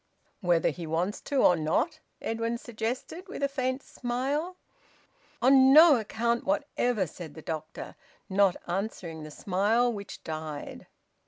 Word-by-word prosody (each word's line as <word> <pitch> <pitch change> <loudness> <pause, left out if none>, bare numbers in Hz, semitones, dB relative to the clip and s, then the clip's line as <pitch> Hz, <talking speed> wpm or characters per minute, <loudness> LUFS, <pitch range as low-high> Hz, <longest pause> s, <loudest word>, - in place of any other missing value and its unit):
"Whether 175 -4 +2
he 170 -2 -7
wants 170 +6 -1
to 280 -2 +1
or 180 - +6
not?" 235 - 0 0.2
Edwin 230 +1 -1
suggested, 245 - -5
with 365 -7 -6
a - - +4
faint 260 -1 -2
smile. 275 +8 -2 0.9
"On 265 +1 +7
no 310 -2 +9
account 235 +2 -1
whatever!" 265 -8 0
said 160 -2 -10
the 160 - -9
doctor, 160 0 -6 0.3
not 195 -1 +3
answering 175 -3 -4
the 155 - -8
smile, 210 +9 +1
which 200 -1 -8
died. 155 -2 -6
225 Hz, 135 wpm, -28 LUFS, 175-260 Hz, 0.9 s, no